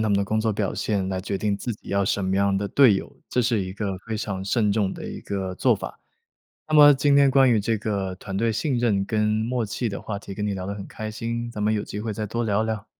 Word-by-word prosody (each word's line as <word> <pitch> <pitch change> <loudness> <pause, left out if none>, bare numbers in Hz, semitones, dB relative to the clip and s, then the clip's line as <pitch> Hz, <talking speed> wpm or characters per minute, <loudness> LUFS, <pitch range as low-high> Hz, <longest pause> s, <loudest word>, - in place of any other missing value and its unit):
他 110 - +1
们 100 - +3
的 100 - +1
工 110 +2 0
作 110 0 +1
表 100 -2 -1
现， 100 -3 -1
来 95 -1 -2
决 100 +1 -3
定 100 0 0
自 120 +3 -4
己 - - -16
要 100 0 +1
什 95 0 0
么 95 +1 0
样 100 0 +2
的 100 0 -2
队 130 -8 +6
友， - - -6
这 125 - +1
是 115 -3 +1
一 95 - -6
个 100 -2 -3
非 110 - -2
常 100 -3 -4
慎 105 0 +1
重 100 -2 0
的 - - -8
一 - - -6
个 95 -2 -3
做 - - +3
法。 - - -7 0.7
那 155 - 0
么 145 -1 +9
今 140 +1 +3
天 140 -1 +6
关 135 -1 +5
于 115 - +4
这 110 +2 0
个 100 -3 -2
团 95 +1 -6
队 115 +2 +1
信 125 +3 -1
任 110 -5 +2
跟 105 -1 +1
默 110 +3 0
契 115 +3 -2
的 100 - -4
话 100 -2 -4
题， 100 -1 -9
跟 105 +1 -3
你 105 - -1
聊 95 -1 -5
得 100 - -3
很 100 - -7
开 110 0 -6
心， 115 +2 -4
咱 105 -3 -5
们 105 +1 +2
有 105 -1 0
机 105 - -6
会 110 0 -3
再 105 +1 -4
多 115 +3 -2
聊 105 0 +1
聊。 110 -2 -3
105 Hz, 305 characters per minute, -24 LUFS, 100-115 Hz, 0.7 s, 么